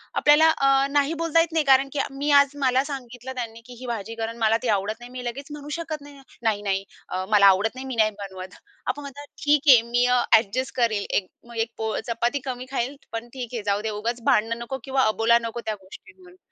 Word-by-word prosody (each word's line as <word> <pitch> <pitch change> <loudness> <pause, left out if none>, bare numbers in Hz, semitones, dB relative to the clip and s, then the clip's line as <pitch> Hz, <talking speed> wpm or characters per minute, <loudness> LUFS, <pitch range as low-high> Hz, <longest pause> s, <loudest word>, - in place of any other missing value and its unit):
आपल्याला 295 +2 +6
अ, 275 -2 +3
"नाही" 290 +2 +2
बोलता 330 0 +2
येत 330 - -1
नाही 315 -3 +1
कारण 270 0 +5
की 285 - -2
मी 280 +2 -3
आज 280 0 +2
मला 260 +1 +3
सांगितलं 260 -3 -7
त्यांनी 230 -2 -6
की 250 - -11
ही 255 - -8
भाजी 225 -1 -4
कर 225 0 -3
अन 230 - -9
मला 225 0 +3
ती - - -1
आवडत 205 +3 -2
नाही. 240 +1 -11
मी 250 -1 -7
लगेच 265 +4 -5
म्हणू 295 0 -8
शकत 320 -3 -5
नाही, 285 -1 -13 0.2
"नाही, 215 -2 +1
नाही, 195 -1 -1 0.3
अ, 185 0 -3
मला 205 -2 +5
आवडत 200 +5 +3
नाही, 260 +1 -7
मी 255 - -4
नाही 215 -1 +3
बनवत." 190 -2 -8 0.3
आपण 290 - -2
म्हणतात, 285 +1 -9 0.2
"ठीक 290 0 +3
आहे, 245 -4 +9
मी 245 +1 +3
अ, 250 0 +3 0.2
एडजस्ट 235 +5 -2
करेल. 225 -5 +1
एक 185 - 0 0.2
मग 235 -1 -10
एक 230 - -28
पोळ 220 -1 -2
चपाती 235 +4 0
कमी 255 -1 -4
खाईल. 270 +1 -2 0.2
पण 230 +1 -5
ठीक 250 -2 -6
आहे, 225 -3 -3
जाऊ 205 0 0
दे, 220 - -2
उगाच 235 +1 -2
भांडणं 230 -3 +2
नको 265 +3 -5
किंवा 265 -1 +1
अबोला 225 +2 +3
नको 230 +1 -4
त्या 215 - -1
गोष्टींवरून." 365 - -15
245 Hz, 235 wpm, -24 LUFS, 225-275 Hz, 0.3 s, आहे